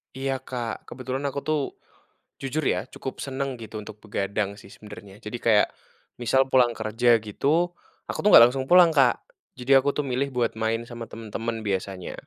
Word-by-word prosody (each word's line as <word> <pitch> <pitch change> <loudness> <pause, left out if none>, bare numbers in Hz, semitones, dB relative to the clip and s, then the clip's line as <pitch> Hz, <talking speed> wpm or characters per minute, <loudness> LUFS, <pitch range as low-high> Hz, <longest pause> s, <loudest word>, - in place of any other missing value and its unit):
Iya 135 +1 -2 0.2
Kak, 120 -3 -3
kebetulan 130 +2 -5
aku 140 0 -3
tuh. 155 -1 +2 0.8
Jujur 140 +3 -2
ya, 90 +4 -1
cukup 130 - -6
senang, 135 -1 -3
gitu, 110 -1 -7
untuk 105 0 -10
begadang 100 -1 -2
sih, - - -15
sebenernya. 105 -2 -12
Jadi, 105 +3 -6
kayak 110 -3 +5 0.5
misal, 130 +3 +3
pulang 125 -2 +5
kerja, 115 +2 +3
gitu, 155 - 0 0.3
aku - - -4
tuh 210 - +3
nggak - - +11
langsung 130 +1 -3
pulang 180 -2 +7
Kak. 135 -5 +3 0.3
Jadi, 125 +2 -2
aku 135 +2 +2
tuh, 150 - -1
milih 135 +1 -1
buat 120 -2 +1
main 110 +1 -1
sama 120 -1 -7
temen-temen 115 0 -5
biasanya, 95 -2 -3
120 Hz, 170 wpm, -25 LUFS, 110-135 Hz, 0.8 s, nggak